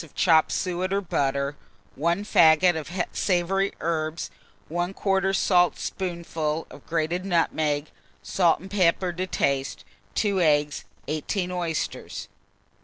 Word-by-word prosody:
of 160 - -16
chopped 160 -3 +4
suet 185 0 -1
or 200 - +2
butter, 140 -6 -1 0.4
1 170 +7 0
faggot 170 -2 +5
of 155 -2 -5 0.3
savoury 195 +1 +1
herbs, 160 0 -2 0.4
1/4 195 +3 0
saltspoonful 170 -4 0
of 145 - -12
grated 165 +2 -1
nutmeg, 155 -5 0 0.3
salt 175 -4 +2
and 190 +2 -11
pepper 180 -2 +2
to 185 +2 -3
taste, 135 -5 -1 0.3
2 200 -3 +1
eggs, 150 -2 +2 0.2
18 175 +5 -2
oysters. 170 -3 -3
170 Hz, 110 wpm, -25 LUFS, 155-185 Hz, 0.4 s, faggot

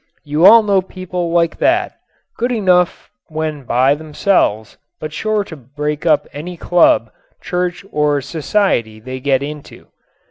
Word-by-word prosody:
You 150 +5 +4
all 230 0 +8
know 200 -2 +2
people 185 -2 -5
like 170 -1 +1
that, 360 +2 +1 0.4
good 245 +2 -1
enough 185 -6 +1 0.2
when 155 -3 -4
by 130 +4 +3
themselves 150 - -1 0.2
but 155 0 -6
sure 215 +3 -1
to 175 - -10
break 150 +4 -5
up 155 -2 +3
any 170 +5 -7
club, 165 -11 +3 0.3
church 180 0 -3
or 150 -1 +1
society 145 - -1
they 130 +3 -7
get 135 0 +1
into. 150 0 -9
155 Hz, 140 wpm, -17 LUFS, 145-185 Hz, 0.4 s, all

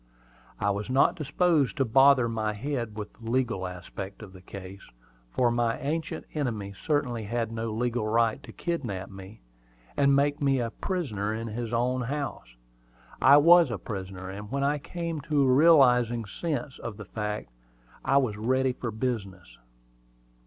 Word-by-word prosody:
I 100 - +1
was 100 +3 -4
not 130 +2 +4
disposed 155 -1 +1
to 135 - +2
bother 135 +1 +5
my 110 -2 -1
head 115 -1 -4
with 105 -1 -6
the 115 -1 -9
legal 120 -6 0
aspect 95 +3 -8
of 95 -3 -11
the 95 - -13
case, 95 +1 -9 0.5
for 120 - +2
my 120 -1 +1
ancient 155 +3 -3
enemy 110 -9 -3
certainly 125 -1 -1
had 115 +1 -2
no 115 0 -3
legal 120 0 -1
right 115 +3 +2
to - - -11
kidnap 120 - -4
me, 95 +2 -11 0.5
and 140 -1 +4
make 145 +2 +1
me 135 -2 +2
a 115 -2 -2
prisoner 115 - -3
in 115 +1 -4
his 115 +1 -4
own 125 +2 0
house. 130 - -4 0.7
I 140 - +8
was 170 +1 +7
a 115 - -2
prisoner; 95 -1 -6
and 100 +2 -7
when 140 0 -1
I 145 +1 +1
came 170 0 -4
to 150 -1 +1
a 130 -1 +4
realizing 125 -6 +5
sense 140 +2 -4
of 110 -3 -6
the 105 - -8
fact, 105 - -4 0.5
I 135 - +3
was 120 -7 +1
ready 130 +4 +1
for 125 -1 -5
business. 110 -6 -4
120 Hz, 165 wpm, -27 LUFS, 105-140 Hz, 0.7 s, I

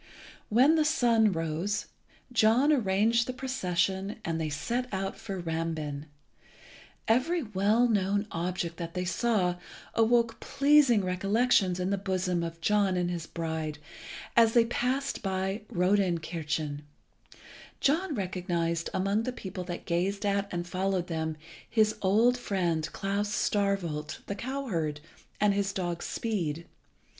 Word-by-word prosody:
When 265 +9 +5
the 310 - +4
sun 235 -8 +3
rose, 165 +5 -2 0.5
John 240 +6 +4
arranged 230 0 +2
the 255 - -3
procession, 195 -6 -1
and 165 0 -1
they 155 - -1
set 235 +12 -2
out 195 0 -2
for 195 -3 -6
Rambin. 160 -3 -3 1.0
Every 285 +9 +2
well 215 +3 +2
known 205 -2 +1
object 170 0 -3
that 170 0 -6
they 180 0 -1
saw 185 -3 +1 0.4
awoke 230 0 +2
pleasing 275 -7 +4
recollections 195 0 +2
in 180 +2 -1
the 200 - 0
bosom 185 -2 -1
of 165 0 -5
John 200 0 +2
and 175 0 0
his 170 -2 -4
bride; 160 -2 -3 0.6
and 230 -1 +7
as 225 - -4
they 235 -1 +5
passed 260 +4 -1
by 190 +1 -2
Rodenkirchen, 170 -6 0 1.0
John 310 +3 +1
recognised, 175 -4 -1
among 195 +3 +1
the 255 - -2
people 190 -6 -6
that 175 -1 -6
gazed 190 +4 -1
at 200 0 +1
and 175 0 -3
followed 185 0 -1
them, 160 -1 -2 0.3
his 215 -1 +3
old 225 +6 +3
friend 170 -8 -1
Klas 200 +1 -2
Starkwolt, 195 -8 -1
the - - -3
cowherd, 200 - -3 0.4
and 210 -1 +4
his 200 -1 0
dog 175 -3 -3
Speed. 170 -8 -2
195 Hz, 130 wpm, -29 LUFS, 170-225 Hz, 1.0 s, and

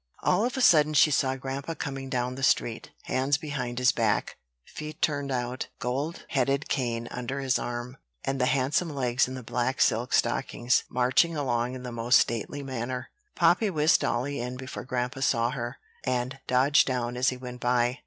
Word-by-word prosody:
All 215 - +3
of 250 +2 -2
a - - 0
sudden 155 -8 +5
she 150 - +6
saw 135 -1 +2
grandpa 135 +4 -5
coming 135 -2 -5
down 125 -1 -1
the 135 - -7
street, 120 -3 +1
hands 135 +2 +1
behind 140 -6 -4
his 125 0 +4
back, 110 -3 0 0.3
feet 150 0 -8
turned 145 -2 0
out, 125 0 -2
gold 140 +7 -3
headed 135 +1 +1
cane 120 -3 -1
under 125 +2 -4
his 135 -2 +1
arm, 120 +2 -5 0.3
and 135 -1 -1
the 125 - +3
handsome 140 +6 +1
legs 125 -1 +1
in 130 - -6
the 130 - -7
black 125 +3 -1
silk 120 +3 +2
stockings 120 +1 +1
marching 130 +7 +2
along 125 -3 -1
in 125 - -8
the 125 - -5
most 120 +1 +4
stately 120 +5 -2
manner. 130 -1 -4 0.2
Poppy 175 +5 +3
whisked 155 -2 +3
dolly 135 +4 -1
in 125 +1 -4
before 130 +1 -7
grandpa 125 +1 -2
saw 120 -3 +2
her, 120 -2 -4 0.3
and 130 +1 -2
dodged 135 +4 +4
down 125 -2 -1
as 125 +1 +2
he 130 - -4
went 125 -1 -8
by. 125 +1 +1
130 Hz, 185 wpm, -27 LUFS, 125-140 Hz, 0.3 s, she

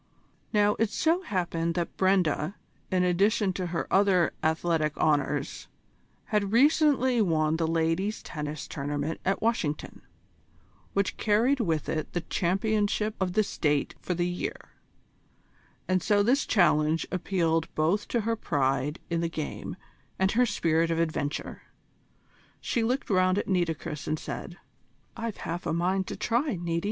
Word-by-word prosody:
Now, 210 -1 +4
it 225 -1 +2
so 325 - +1
happened 170 - -1
that 170 -2 -2
Brenda, 185 -2 +1 0.3
in 185 -1 +2
addition 195 +2 +2
to 180 -1 -3
her 170 -1 -2
other 190 -3 +4
athletic 160 -1 0
honours, 150 -2 0 0.6
had 205 -3 0
recently 260 -1 +4
won 160 -4 +2
the 165 -1 0
Ladies' 165 +6 0
Tennis 150 -1 -5
Tournament 145 +2 -3
at 195 +3 0
Washington, 175 -10 -1 0.9
which 200 -1 0
carried 230 +6 +2
with 165 - 0
it 155 -1 -3
the 175 - -1
Championship 210 +4 0
of 185 -2 -1
the 215 +2 +3
State 150 -7 0
for 180 - -2
the 175 +1 0
year, 180 0 -5 1.2
and 185 0 +2
so 205 +1 +3
this 260 +7 +2
challenge 160 -5 +3
appealed 165 -3 0
both 170 +7 +1
to 235 - 0
her 230 +2 0
pride 140 - 0
in 170 0 +1
the 170 - 0
game 155 -2 -5 0.4
and 190 +1 +2
her 245 +2 +3
spirit 165 -4 +1
of 165 - 0
adventure. 155 -3 -2 1.0
She 235 - -1
looked 245 +2 -1
round 185 0 +3
at - - -1
Nitocris, 165 -5 -1
and 155 - 0
said: 175 +3 -7 0.6
"I've 230 -2 -4
half 170 +2 -4
a - - 0
mind 185 +3 0
to - - -4
try, 245 +1 0
Niti. 170 -1 -2
180 Hz, 145 wpm, -28 LUFS, 160-210 Hz, 1.2 s, Now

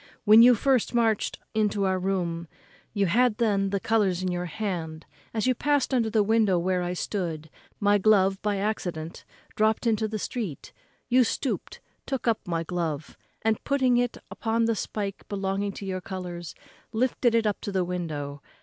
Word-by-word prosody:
When 215 +1 +8
you 245 +1 +8
first 255 0 +1
marched 225 -3 +1 0.2
into 210 -2 +1
our 190 -1 0
town, 175 -3 -1 0.4
you 200 -2 +1
had 225 +4 +3
then 200 -4 +1
the 200 0 -1
colours 195 -4 +1
in 185 - 0
your 175 0 -2
hand; 165 -4 -4 0.3
as 220 0 -1
you 255 - +4
passed 285 +1 +1
under 235 -3 +2
the 215 -1 +3
window 215 -3 +3
where 180 +1 0
I 175 0 -2
stood, 165 -5 -3 0.3
my 205 0 +3
glove, 195 -1 +3
by 205 -1 0
accident, 175 -6 -3 0.3
dropt 220 +2 +2
into 220 -1 +2
the 215 0 -3
street; 210 - -5 0.3
you 255 +1 +4
stoopt, 255 +3 -3 0.3
took 265 -3 -3
up 225 -4 0
my 165 -1 -1
glove, 160 -4 -3 0.3
and, 220 -1 +1
putting 265 -3 +2
it 245 -1 0
upon 225 0 0
the 230 0 +1
spike 200 -2 -4
belonging 200 0 -1
to 200 - -7
your 185 -1 -3
colours, 180 -3 -6 0.4
lifted 240 0 +1
it 230 -1 +2
up 210 -2 0
to 205 - -4
the 190 -2 0
window. 150 -5 -4
205 Hz, 175 wpm, -26 LUFS, 180-225 Hz, 0.4 s, When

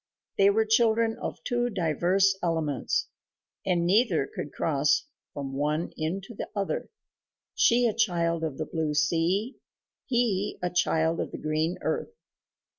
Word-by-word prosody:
They 195 0 +7
were 220 +2 +2
children 225 0 +3
of - - -5
two 245 0 0
diverse 190 - +2
elements, 160 -5 0 0.6
and 175 -2 +2
neither 190 - +3
could 145 - -5
cross 145 -1 +1 0.3
from 140 -2 -5
one 150 +4 -1
into 185 +8 -4
the - - -6
other 200 -1 -2 0.6
she 240 +1 +4
a 225 - +2
child 170 -6 +1
of 155 -4 -3
the 155 - -2
blue 155 -2 -2
sea, 170 - +1 0.5
he 230 -6 0
a 180 0 -2
child 165 -2 +1
of - - -2
the - - -7
green 155 +3 -1
earth. 470 - -2
175 Hz, 140 wpm, -27 LUFS, 160-215 Hz, 0.6 s, They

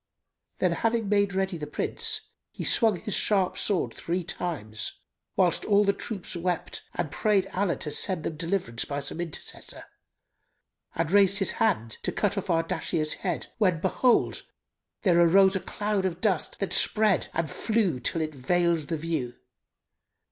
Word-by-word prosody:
Then, - - +2
having 225 -1 0
made 200 -1 +2
ready 190 -3 -1
the 150 - -5
Prince 440 - -2 0.3
he - - -7
swung 220 -6 +3
his 210 -2 -3
sharp 195 -4 +2
sword 200 -4 0
three 175 +2 -2
times 140 -12 -3 0.4
(whilst 180 -3 +2
all 205 0 +4
the 200 0 +3
troops 195 -3 -5
wept 175 0 -2
and 170 -4 -2
prayed 205 -3 +2
Allah 185 -2 +1
to 150 - -5
send 185 +1 0
them 160 - -3
deliverance 165 -8 -2
by 140 0 -3
some 145 +4 -4
intercessor), 165 -3 -6 1.1
and 165 0 -1
raised 195 -1 +5
his 195 - +1
hand 175 - 0
to - - -1
cut 205 -1 0
off 195 -1 -4
Ardashir's 165 -2 0
head 175 -4 -3
when, 185 -6 +3
behold, 235 +8 +2 0.6
there 175 -3 +5
arose 190 +3 +6
a - - +1
cloud 205 0 -2
of 175 -2 -2
dust, 190 -6 0
that 195 - -2
spread 215 -3 +3
and 165 -1 -1
flew 205 - 0
till 165 - -1
it 155 -1 -2
veiled 170 +3 +1
the 165 - -1
view. 150 -6 -3
180 Hz, 160 wpm, -27 LUFS, 165-200 Hz, 1.1 s, arose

